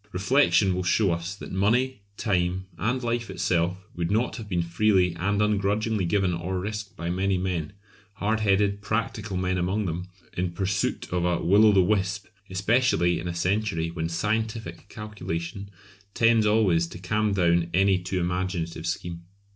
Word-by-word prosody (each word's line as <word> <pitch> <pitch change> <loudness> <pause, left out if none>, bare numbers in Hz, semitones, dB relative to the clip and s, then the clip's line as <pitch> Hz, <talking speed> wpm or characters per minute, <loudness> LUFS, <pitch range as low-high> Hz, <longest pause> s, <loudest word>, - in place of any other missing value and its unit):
Reflection 100 0 +3
will 90 - -1
show 95 +2 +2
us 85 +4 -3
that - - -9
money, 115 +5 +1 0.2
time, 95 -2 0
and 125 +6 0
life 120 0 -1
itself 90 +2 -1
would 85 -1 -2
not 110 +5 0
have 110 -3 -8
been 90 -3 0
freely 90 0 +2
and 100 +4 +1
ungrudgingly 105 0 +1
given 95 +1 +1
or 90 +2 -3
risked 105 +2 -5
by 85 +1 -3
many 95 +1 +1
men 90 -3 -2 0.4
hard 105 +2 0
headed, 100 -1 +2
practical 105 -2 -2
men 90 0 0
among 95 +4 0
them 90 +1 -3 0.3
in 90 -1 -2
pursuit 95 +2 -1
of 90 -1 0
a 90 -1 +1
Will 100 +5 +6
o' - - +7
the 95 -2 +5
Wisp, 100 +1 0 0.2
especially 95 -3 +2
in 90 - -5
a 85 - -3
century 85 -2 0
when 80 -1 -3
scientific 105 0 -2
calculation 100 -3 -5 0.5
tends 115 -2 +4
always 95 -6 +3
to 85 - -9
calm 105 +4 0
down 85 -2 +2
any 95 0 +3
too 90 +1 -3
imaginative 90 -1 -2
scheme. 85 -1 -4
95 Hz, 165 wpm, -26 LUFS, 90-105 Hz, 0.5 s, o